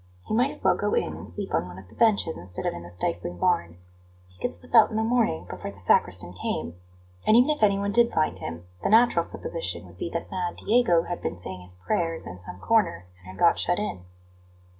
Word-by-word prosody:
He - - -4
might 245 +5 +3
as - - -4
well - - +4
go - - 0
in 470 - -1
and - - -9
sleep 200 -2 -6
on 90 - +1
one 90 0 -10
of 95 -1 -12
the - - -19
benches 210 -8 +2
instead 90 0 -4
of - - 0
in 85 - -7
the 85 - -10
stifling 90 0 -3
barn; 85 0 0 0.5
he 90 -1 -24
could - - -1
slip 85 - -10
out 225 -3 +7
in 220 - -6
the 220 - +1
morning 225 - +1
before - - -6
the 100 0 -12
sacristan 90 -2 +2
came; 90 - -3 0.5
and 215 - +7
even 250 +5 +5
if 300 - -2
anyone 200 -1 +3
did 235 +2 +4
find 155 - 0
him, 85 +1 -6 0.2
the - - 0
natural 230 +3 +5
supposition - - -3
would - - -16
be - - -3
that - - -5
mad 180 -2 -2
Diego 215 -8 +3
had 175 0 -5
been 90 - -3
saying 90 +1 -6
his 90 0 -3
prayers 165 - -1
in 90 +1 -8
some 90 0 -9
corner, 195 - +1
and 95 - -18
had 95 - -10
got 170 - +4
shut 175 - +1
in. 205 - -4
165 Hz, 235 wpm, -26 LUFS, -, 0.5 s, out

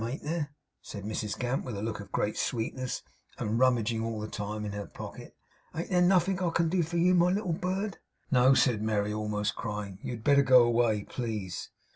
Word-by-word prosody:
Ain't 120 +5 -4
there,' 150 -1 -2 0.3
said 100 - -8
Mrs 105 0 -3
Gamp, 125 +2 -1
with 120 -5 -5
a 100 - -4
look 110 -2 -3
of 100 -1 -10
great 105 - 0
sweetness, 125 +2 -2 0.3
and 110 +2 -1
rummaging 120 -3 +2
all 115 -1 -3
the 105 - -4
time 105 0 -4
in 105 - -3
her 100 -1 -5
pocket; - - -9 0.4
'ain't 165 +3 -4
there 180 -1 +4
nothink 185 +1 +3
I 180 - +2
can 165 0 +1
do 180 +1 +2
for 170 +1 -2
you, 180 +2 +4
my 175 0 +5
little 185 -2 0
bird?' 185 +3 -2 0.3
'No,' 130 0 +6
said 120 -4 +3
Merry, 105 -1 0
almost 105 -1 -1
crying. 105 -4 -5
'You - - -4
had 115 -2 -8
better 140 +1 +5
go 130 -3 +7
away, 115 -3 +2
please! 105 -8 -4
120 Hz, 205 wpm, -29 LUFS, 105-165 Hz, 0.4 s, go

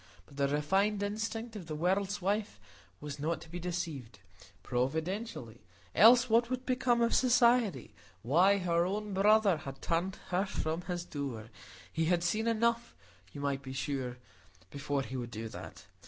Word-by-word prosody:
But 140 - -17
the 140 0 +2
refined 195 +9 +1
instinct 225 +2 -3
of 185 -6 -7
the 155 - -4
world's 190 +4 0
wife 205 +2 -1 0.4
was 145 -1 -7
not 160 +3 -1
to 160 - -12
be 175 +2 -6
deceived; 165 -10 -4 0.5
providentially!—else 160 - +1
what 235 +1 +3
would 255 0 -3
become 250 -2 +1
of 235 - +1
Society? 235 - +3 0.3
Why, 180 - +4
her 170 -3 +1
own 205 +3 -3
brother 205 -1 +4
had 135 -2 -8
turned 175 +6 -1
her 185 +3 0
from 160 -2 -2
his 175 -1 -4
door; 125 -8 -5 0.4
he 165 0 0
had 175 +1 +2
seen 215 +6 0
enough, 235 +1 +1 0.4
you 140 - -8
might 140 -1 -1
be 130 -1 -8
sure, 130 -2 -3 0.5
before 140 -1 -2
he 130 - -7
would 120 -1 -4
do 115 0 -6
that. - - -10
175 Hz, 155 wpm, -32 LUFS, 140-215 Hz, 0.5 s, Why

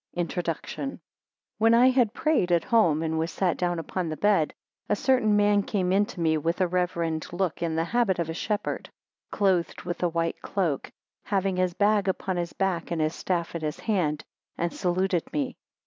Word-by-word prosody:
Introduction. 175 - -3 0.6
WHEN 225 +1 +5
I 250 +2 +6
had 250 -5 +3
prayed 305 - +1
at 170 -1 +3
home, 170 -10 +3
and 160 0 -1
was 165 +1 -1
sat 180 -1 0
down 175 -1 -1
upon 165 +1 -3
the 155 - -4
bed, 200 -7 +3 0.4
a 210 - +3
certain 235 -3 +3
man 205 0 +4
came 190 -3 -1
in 200 +2 +3
to 215 - -9
me 160 -2 +2
with 165 +4 -1
a 185 - +4
reverend 170 -2 -1
look, 175 -2 -2
in 165 -2 -1
the 165 - +1
habit 205 +1 +1
of 170 -2 -1
a 160 - -3
Shepherd, 205 +5 -3 0.4
clothed 190 -4 0
with 175 -1 -4
a 175 - +2
white 165 0 -2
cloak, 170 -9 -2 0.3
having 195 -2 0
his 185 -1 +1
bag 205 -1 +2
upon 190 -1 -1
his 170 -1 -2
back, 190 -4 -1
and 170 - -2
his 155 +1 +1
staff 175 -3 -2
in 170 - -4
his 150 -1 -3
hand, 165 -9 0 0.3
and 170 0 -1
saluted 180 -1 0
me. 275 -4 -2
180 Hz, 195 wpm, -26 LUFS, 165-205 Hz, 0.6 s, I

